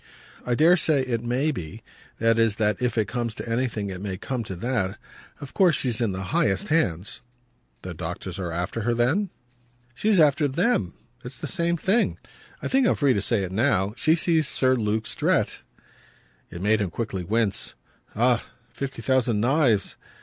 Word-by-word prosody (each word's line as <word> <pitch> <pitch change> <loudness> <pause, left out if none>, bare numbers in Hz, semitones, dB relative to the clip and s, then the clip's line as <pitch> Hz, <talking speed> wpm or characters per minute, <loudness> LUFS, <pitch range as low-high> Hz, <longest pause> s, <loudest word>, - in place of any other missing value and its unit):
"I 120 - 0
dare 170 +7 +5
say 155 -4 +2
it 120 -3 -2
may 125 +6 0
be; 90 - -7 0.3
that 115 0 +2
is 115 -3 +3
that 105 0 0
if 120 -2 -1
it 110 -3 +2
comes 115 0 -3
to - - -7
anything 115 -4 -1
it 90 0 -7
may 95 -2 -4
come 130 +4 -3
to 95 - -5
that. 105 -1 -1 0.4
Of 140 - -9
course 180 -6 +4
she's 120 -3 -1
in 115 -4 +1
the 95 0 -4
highest 95 -2 +1
hands." 100 - 0 0.6
"The 95 - -6
doctors 90 +3 -6
are 90 -3 -3
after 90 +7 -3
her 120 +2 0
then?" 145 - +1 0.6
"She's 205 - +2
after 145 -1 +4
THEM 140 - 0 0.3
it's 125 0 -8
the - - -6
same 170 0 0
thing. 200 +8 +1 0.5
I - - -1
think 265 -2 +3
I'm - - +3
free 140 -3 +3
to 100 - 0
say 105 0 +1
it 95 - -4
now 105 -2 +1
she 155 +5 +3
sees 165 -3 +2
Sir 130 -1 +2
Luke 110 -2 -1
Strett." - - 0 0.9
It 85 - -7
made 110 +1 +3
him 100 - -1
quickly 95 -1 -4
wince. 105 +1 0 0.4
"Ah 120 +1 +2 0.3
fifty 135 -4 -5
thousand 125 -4 +2
knives!" 125 -3 +2
115 Hz, 180 wpm, -25 LUFS, 100-140 Hz, 0.9 s, dare